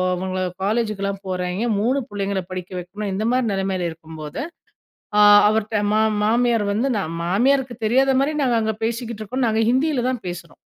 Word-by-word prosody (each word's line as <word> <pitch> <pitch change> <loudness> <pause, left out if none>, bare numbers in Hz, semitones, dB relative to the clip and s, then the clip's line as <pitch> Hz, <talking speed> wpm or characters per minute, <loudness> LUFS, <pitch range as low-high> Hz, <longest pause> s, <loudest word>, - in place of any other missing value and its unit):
அவங்க 185 +1 -3 0.2
காலேஜுக்குலாம் 200 -2 -1
போறாய்ங்க. 185 +4 -2
3 260 +5 +1
பிள்ளைங்கள 200 -1 -2
படிக்க 185 0 -6
வைக்கணும். 200 +3 -5
இந்த 205 +3 -2
மாரி 255 -2 +1
நிலைமையில 190 -3 -1
இருக்கும்போது, 160 - -8 0.8
ஆ - - +7 0.3
அவர்ட்ட 215 -1 0
ம - - +3 0.3
மாமியார் 230 -1 +2
வந்து, 240 +6 0 0.4
மாமியாருக்கு 250 +6 +1
தெரியாத 265 +3 +3
மாரி 290 +3 0
நாங்க 245 -3 +2
அங்கே 220 -1 -1
பேசிக்கிட்டு 230 -1 -4
இருக்கோம். 255 +3 -1
நாங்க 220 0 +1
ஹிந்தியிலதான் 255 -4 0
பேசுறோம். 175 -2 -7
215 Hz, 145 wpm, -21 LUFS, 190-245 Hz, 0.8 s, ஆ